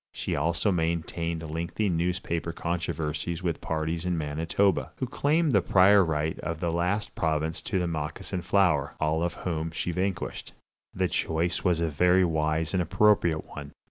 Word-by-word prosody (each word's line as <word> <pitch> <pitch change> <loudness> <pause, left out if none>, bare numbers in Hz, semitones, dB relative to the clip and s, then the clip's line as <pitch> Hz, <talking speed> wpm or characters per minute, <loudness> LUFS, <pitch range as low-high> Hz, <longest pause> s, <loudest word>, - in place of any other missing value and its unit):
She - - -3
also 85 +7 +1
maintained 85 -1 -2
lengthy 85 +7 -2
newspaper 85 -2 -1
controversies 85 0 -3
with 85 -3 -2
parties 80 +1 -2
in 90 -1 -1
Manitoba, 80 +6 0
who 130 - -2
claimed 150 +4 +1
the 100 -5 +4
prior 95 +3 +5
right 80 0 -1
of 85 -1 -4
that 90 +4 0
province 80 0 -1
to - - -2
the 90 - 0
moccasin 80 +3 -3
flower, 85 -8 +2
all 80 +1 +1
of 85 0 -1
whom 80 -2 -3
she 85 +2 -3
vanquished. 95 +2 -3 0.4
The 95 0 0
choice 85 0 -1
was 90 -3 +2
a 85 - +1
very 90 +4 +3
wise 80 0 0
and 95 - +2
appropriate 90 -2 +3
one. 70 -1 -9
85 Hz, 155 wpm, -27 LUFS, 80-90 Hz, 0.4 s, prior